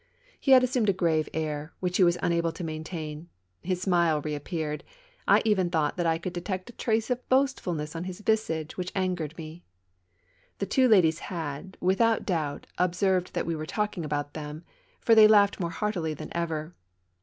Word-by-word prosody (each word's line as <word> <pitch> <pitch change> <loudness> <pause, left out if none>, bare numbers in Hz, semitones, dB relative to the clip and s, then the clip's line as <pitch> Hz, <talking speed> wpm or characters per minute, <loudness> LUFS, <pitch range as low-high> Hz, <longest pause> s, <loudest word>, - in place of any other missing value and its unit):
He 270 - +4
had 255 -1 +8
assumed 250 -4 +1
a - - +4
grave 165 -4 +1
air, 155 -1 -3
which 180 -1 -1
he 190 - +5
was 175 0 +4
unable 170 -1 +1
to - - -7
maintain; 155 0 -6 0.3
his 185 0 -2
smile 170 -5 +3
reappeared; 150 +1 -4 0.4
I - - +5
even 190 -5 +2
thought 155 -4 0
that 175 -1 +1
I 165 0 +2
could 175 +2 -5
detect 185 +4 -4
a - - -28
trace 225 +1 0
of 250 0 -3
boastfulness 180 - 0
on 165 +2 -4
his 185 +2 -7
visage, 185 -8 -1
which 180 0 -3
angered 180 -5 -2
me. 160 +1 -9 0.9
The 200 - -2
two 255 +6 +3
ladies 170 -8 +4
had, 165 0 -6
without 220 +5 +2
doubt, 155 -6 -2
observed 180 +1 +1
that - - -1
we 165 - -1
were 155 0 -5
talking 205 -1 -2
about 145 -1 -3
them, 150 +1 -7 0.4
for 230 - +4
they 220 -1 +9
laughed 205 -1 +5
more 170 -2 -1
heartily 170 -5 -2
than 155 +3 -8
ever. 165 -1 -2
175 Hz, 180 wpm, -27 LUFS, 155-195 Hz, 0.9 s, they